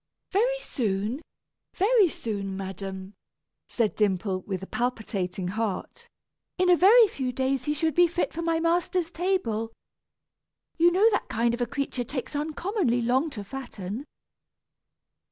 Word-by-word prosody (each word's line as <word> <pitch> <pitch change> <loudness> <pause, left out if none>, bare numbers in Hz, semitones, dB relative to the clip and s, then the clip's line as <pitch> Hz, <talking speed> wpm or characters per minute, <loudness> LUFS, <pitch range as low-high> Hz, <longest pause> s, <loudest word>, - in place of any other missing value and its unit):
"Very 485 +6 +2
soon, 225 - -2 0.5
very 410 -1 +4
soon, 200 -7 -4
madam," 190 0 -6 0.6
said 230 -4 0
Dimple, 190 -2 0
with 190 -2 -3
a - - -4
palpitating 195 -7 -2
heart; 210 -1 -3 0.5
"in 365 0 +4
a - - +8
very 430 +6 +7
few 260 -9 -3
days 260 0 -1
he 295 - +1
should 320 +1 0
be 350 +4 +5
fit 345 +1 -2
for 335 - -4
my 330 -1 +1
master's 340 +1 +1
table. 245 - -1 1.0
You 340 +1 +5
know 390 +5 +5
that - - -1
kind 235 +1 +1
of 240 - -3
a 240 - +1
creature 270 -1 -2
takes 260 +3 -5
uncommonly 305 - 0
long 260 +7 +2
to 215 -8 -7
fatten." 230 -1 -6
255 Hz, 140 wpm, -27 LUFS, 210-340 Hz, 1.0 s, a